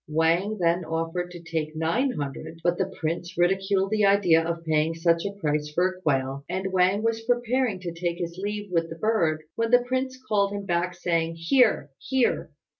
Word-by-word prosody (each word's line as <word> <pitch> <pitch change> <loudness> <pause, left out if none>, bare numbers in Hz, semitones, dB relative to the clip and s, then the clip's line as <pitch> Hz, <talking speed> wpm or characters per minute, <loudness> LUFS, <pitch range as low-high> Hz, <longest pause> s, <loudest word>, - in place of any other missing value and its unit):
Wang 165 +7 +1
then 170 +1 +2
offered 165 +2 -2
to 175 -1 -9
take 160 -2 -3
nine 165 - +1
hundred; 145 +3 -6
but 175 0 +1
the 190 0 -1
prince 170 +2 -3
ridiculed 195 +2 +2
the 215 -1 +2
idea 195 -5 +5
of 170 0 -4
paying 155 +1 +1
such 165 +1 +2
a 200 - -2
price 150 -3 -1
for 180 +5 +2
a 185 0 -11
quail, 135 -3 0
and 190 +1 -2
Wang 190 +3 +3
was 225 0 0
preparing 240 -2 0
to 175 -2 -5
take 170 0 -2
his 170 -1 -4
leave 205 0 -4
with 165 -1 +1
the 165 - -6
bird, 165 -7 +1
when 230 0 -1
the 245 0 +5
prince 260 +1 -2
called 200 -1 +2
him 200 -1 -4
back, 175 0 0
saying, 165 -2 -1
"Here! 165 - +2
here! 265 -2 0
175 Hz, 190 wpm, -26 LUFS, 165-205 Hz, -, idea